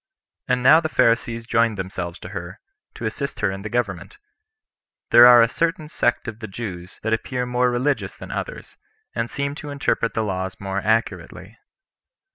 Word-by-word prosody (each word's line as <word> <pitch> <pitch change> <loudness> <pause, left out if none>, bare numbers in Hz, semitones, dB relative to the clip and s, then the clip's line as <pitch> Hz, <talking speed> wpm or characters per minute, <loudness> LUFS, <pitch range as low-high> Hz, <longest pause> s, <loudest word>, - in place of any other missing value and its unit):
And 125 0 +1
now 155 +5 +8
the 160 -1 -3
Pharisees 115 -3 +1
joined 115 -2 +2
themselves 95 -2 -5
to 90 - -8
her, 90 -3 -7 0.4
to - - -6
assist - - -4
her - - +2
in 95 0 -6
the 105 - -6
government. 100 -8 -3 0.9
These - - +7
are 120 -1 +9
a - - +3
certain 165 +3 -1
sect 120 - 0
of 115 -1 -6
the 110 - -6
Jews 95 -4 -7
that 110 +1 0
appear 125 +2 -2
more 125 0 +1
religious 130 +4 -1
than - - -9
others, - - -6 0.4
and 115 - -2
seem 140 0 -2
to 150 - -7
interpret 135 -4 -1
the 110 - +1
laws 95 -2 -3
more 95 0 -3
accurately. 110 +2 -2
115 Hz, 175 wpm, -22 LUFS, 95-125 Hz, 0.9 s, are